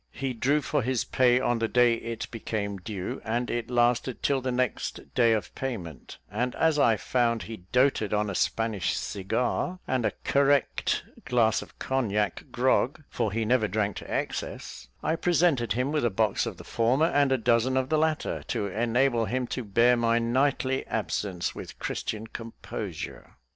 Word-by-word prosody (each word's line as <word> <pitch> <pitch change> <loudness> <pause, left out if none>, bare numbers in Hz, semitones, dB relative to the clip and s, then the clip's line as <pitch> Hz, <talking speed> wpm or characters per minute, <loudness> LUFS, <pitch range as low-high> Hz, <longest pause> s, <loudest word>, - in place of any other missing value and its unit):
He 135 -2 -3
drew 135 +6 +2
for 145 - 0
his 125 0 0
pay 125 -1 +3
on 120 -2 +1
the 115 - +1
day 120 0 +4
it 115 0 -4
became 105 -3 -3
due, 95 -1 -5
and 120 +2 -1
it 120 -1 -2
lasted 120 0 +1
till 135 -2 +2
the 130 0 -1
next 125 -1 -2
day 120 -2 +4
of 110 -5 -1
payment; 100 - -6
and 125 +4 -1
as 160 -2 +2
I 115 -5 +4
found 115 0 +1
he 115 0 -7
doated 125 -4 +3
on 105 0 +1
a 100 - -3
Spanish 110 0 0
cigar, 125 - -1
and 130 -2 0
a - - +1
correct 140 -1 +2 0.2
glass 115 -3 +2
of - - -13
cognac 105 -7 -1
grog 130 +3 +1
for 110 - -1
he 110 +2 -1
never 115 -1 +3
drank 105 -2 -1
to - - -8
excess 65 +2 -4 0.2
I 160 - +1
presented 165 - +2
him 125 +5 0
with 150 -3 0
a 120 - +3
box 110 +1 +1
of - - -5
the - - -10
former, 125 +7 +2
and 145 -4 +3
a 130 - +4
dozen 120 +2 +2
of 130 0 0
the 155 - +2
latter, 155 -1 0
to - - -1
enable 120 +4 +1
him 125 +4 -1
to 125 - -3
bear 115 +4 +4
my 115 -1 +2
nightly 130 +2 +1
absence 100 -4 -2
with - - -9
Christian 110 0 -3
composure. 115 - -7
120 Hz, 175 wpm, -27 LUFS, 110-130 Hz, 0.2 s, day